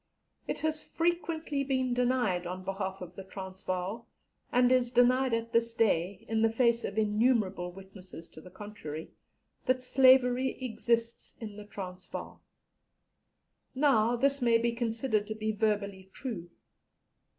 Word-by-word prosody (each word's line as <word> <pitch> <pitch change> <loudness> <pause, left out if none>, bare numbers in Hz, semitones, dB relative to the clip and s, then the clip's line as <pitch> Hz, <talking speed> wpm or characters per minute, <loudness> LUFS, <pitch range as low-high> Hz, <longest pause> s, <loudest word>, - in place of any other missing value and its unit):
It - - -3
has 315 -1 0
frequently 330 -4 -1
been 260 -2 0
denied 245 -8 +1
on 185 +1 -5
behalf 190 0 -3
of 180 -1 -8
the 195 - -7
Transvaal, 190 +2 -5 0.4
and 250 0 +4
is 250 -1 +3
denied 250 +1 +4
at 230 0 -4
this 230 0 +2
day, 195 -4 +1
in 220 0 0
the 225 - +4
face 235 0 +2
of 200 - -4
innumerable 210 -4 +1
witnesses 190 -2 -11
to 155 - -13
the 180 - -12
contrary, 185 -5 -8 0.6
that 255 0 +2
slavery 255 0 +4
exists 235 -1 -1
in 215 -3 -7
the 210 0 -9
Transvaal. 185 -3 -8 1.3
Now, 245 -5 +3
this 275 +3 +2
may 235 -1 +5
be 235 +1 +1
considered 225 -2 -1
to 215 - -4
be 215 0 -1
verbally 200 -3 -1
true. 195 -10 -6
225 Hz, 140 wpm, -30 LUFS, 195-250 Hz, 1.3 s, may